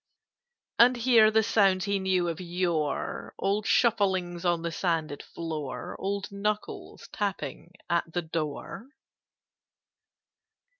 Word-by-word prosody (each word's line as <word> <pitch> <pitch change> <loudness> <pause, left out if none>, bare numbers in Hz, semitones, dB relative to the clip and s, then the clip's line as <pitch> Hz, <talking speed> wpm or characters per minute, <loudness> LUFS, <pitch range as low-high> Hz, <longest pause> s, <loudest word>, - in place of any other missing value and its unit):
] 485 0 -48
"And 245 +1 +7
hear 235 -3 +5
the 220 0 +3
sounds 195 -4 +3
he 200 -1 0
knew 185 -2 +1
of 165 +1 -3
yore, 170 -4 -2
Old 200 +2 0
shufflings 190 -7 +2
on 175 -1 +1
the 170 - -2
sanded 165 -4 -1
floor, 155 -5 -6
Old 200 +1 -3
knuckles 210 +1 -4
tapping 180 -5 -4
at 170 -1 0
the 175 +1 -2
door? 160 - -4
185 Hz, 115 wpm, -28 LUFS, 170-210 Hz, -, And